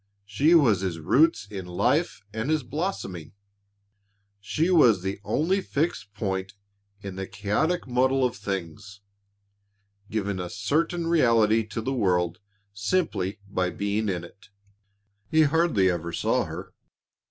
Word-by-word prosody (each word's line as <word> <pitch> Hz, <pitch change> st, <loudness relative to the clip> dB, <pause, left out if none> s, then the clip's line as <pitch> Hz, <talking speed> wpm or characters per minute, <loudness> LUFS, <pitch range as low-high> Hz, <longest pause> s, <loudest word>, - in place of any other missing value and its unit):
She 140 Hz, +12 st, +3 dB
was 115 Hz, -, +4 dB
his 90 Hz, -4 st, -2 dB
roots 115 Hz, -, +3 dB
in 95 Hz, -3 st, -7 dB
life 120 Hz, -, 0 dB
and 110 Hz, +5 st, -3 dB
his 155 Hz, -3 st, +1 dB
blossoming. 130 Hz, -, -4 dB, 1.1 s
She 160 Hz, -, 0 dB
was 120 Hz, -, +5 dB
the 95 Hz, +1 st, -3 dB
only 185 Hz, -, +1 dB
fixed 140 Hz, -, -2 dB
point 95 Hz, -2 st, -3 dB, 0.5 s
in 95 Hz, -1 st, -7 dB
the 95 Hz, 0 st, -4 dB
chaotic 110 Hz, -, -1 dB
muddle 130 Hz, +1 st, +2 dB
of 125 Hz, -, -1 dB
things, 95 Hz, +1 st, -6 dB, 1.1 s
giving 100 Hz, -3 st, -2 dB
a 90 Hz, -1 st, -4 dB
certain 165 Hz, -, -1 dB
reality 115 Hz, -9 st, +3 dB
to 110 Hz, +2 st, -4 dB
the 130 Hz, +4 st, -2 dB
world 90 Hz, -7 st, +1 dB, 0.3 s
simply 105 Hz, -, -1 dB
by 95 Hz, -2 st, -1 dB
being 100 Hz, +3 st, -1 dB
in 90 Hz, -3 st, -2 dB
it. 95 Hz, +3 st, -15 dB, 0.8 s
He 155 Hz, 0 st, +5 dB
hardly 150 Hz, -, +3 dB
ever 85 Hz, -1 st, -4 dB
saw -, -, 0 dB
her. -, -, -8 dB
105 Hz, 130 wpm, -26 LUFS, 95-145 Hz, 1.1 s, was